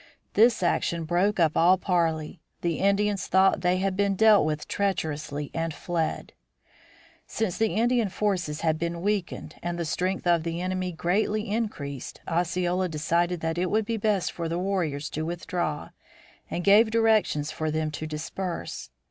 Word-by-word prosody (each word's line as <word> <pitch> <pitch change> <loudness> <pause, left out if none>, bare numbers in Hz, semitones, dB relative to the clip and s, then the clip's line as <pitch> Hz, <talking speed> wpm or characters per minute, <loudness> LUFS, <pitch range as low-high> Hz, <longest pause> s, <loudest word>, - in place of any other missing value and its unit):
This 225 -1 +4
action 170 -1 0
broke 180 +5 +1
up 160 -2 +3
all 180 +3 +5
parley; 165 -4 -1 0.2
the 170 -2 -1
Indians 200 -1 +1
thought 190 0 +4
they 180 +1 +2
had 190 0 0
been 200 0 +1
dealt 215 -5 +5
with 150 -1 -3
treacherously 155 -7 -2
and 165 -2 -2
fled. 170 -4 -3 0.9
Since 220 -4 -2
the 220 -5 +1
Indian 235 -1 +2
forces 185 -6 -1
had 160 -1 +1
been 170 0 -3
weakened 205 -3 -2
and 175 0 -3
the 170 - -2
strength 185 +5 -2
of 170 -2 +3
the 165 +1 -3
enemy 185 0 -2
greatly 205 +5 0
increased, 150 - -4
Osceola 180 +2 0
decided 170 +2 0
that 165 +1 -1
it 180 0 0
would 220 0 +1
be 230 +1 -2
best 205 -3 0
for 170 - -5
his 165 - -2
warriors 175 -6 -1
to 155 - -3
withdraw 170 -2 -3 0.6
and 175 - -3
gave 210 +4 +6
directions 220 -10 +2
for 155 0 -2
them 155 0 -1
to 155 +1 -5
disperse. 155 - -5
175 Hz, 160 wpm, -26 LUFS, 160-200 Hz, 0.9 s, gave